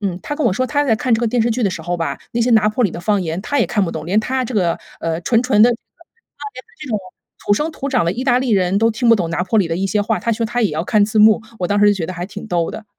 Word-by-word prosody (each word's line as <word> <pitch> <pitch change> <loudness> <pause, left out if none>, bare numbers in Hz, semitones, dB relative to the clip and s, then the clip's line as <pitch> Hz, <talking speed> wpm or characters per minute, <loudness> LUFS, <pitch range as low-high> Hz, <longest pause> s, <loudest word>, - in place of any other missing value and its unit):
嗯， 190 -4 -3
她 290 - -5
跟 295 -5 0
我 205 - +2
说 255 +7 0
她 290 +2 0
在 230 - +2
看 235 +2 -1
这 225 - +3
个 235 - +1
电 230 0 +1
视 235 - 0
剧 240 +2 -1
的 195 - +1
时 165 - -6
候 175 +2 -2
吧， 165 - -3 0.2
那 235 - -1
些 245 - +1
拿 215 -2 +4
坡 230 +3 0
里 190 - +1
的 - - -6
方 205 +2 +1
言 165 0 -3
她 285 +6 -1
也 - - +2
看 205 -2 0
不 165 - -3
懂。 160 -1 -6
连 200 +4 +1
她 255 +4 -2
这 245 - -6
个， 175 -5 +1 0.2
呃， 165 0 -2
纯 230 +5 +2
纯 250 -5 +2
的 240 - +7
这 240 - 0
个 - - -9
就 - - -50 0.7
连 255 - -9
她 - - -27
这 300 - -7
种 215 -3 -1 0.5
土 205 - +2
生 300 +10 0
土 275 - -5
长 215 - +1
的 170 - 0
意 245 - -4
大 250 -2 +3
利 255 -1 -2
人 190 -1 +2
都 225 - +3
听 235 +2 -1
不 230 - +6
懂 175 -5 -2
拿 170 - -1
坡 190 +4 +1
里 190 - +2
的 165 0 -2
一 190 - -2
些 210 +1 0
话， 215 +2 -1
她 230 - -1
说 230 0 -1
她 240 +1 -1
也 210 - +2
要 155 +3 -3
看 210 -1 +3
字 215 +1 -1
幕， 215 +1 +5 0.2
我 180 - -1
当 205 +2 0
时 205 - +5
就 - - +5
觉 170 -5 -3
得 185 - -5
还 175 0 -5
挺 205 +2 -9
逗 170 -4 -1
的。 220 - -8
215 Hz, 385 characters per minute, -18 LUFS, 180-240 Hz, 0.7 s, 的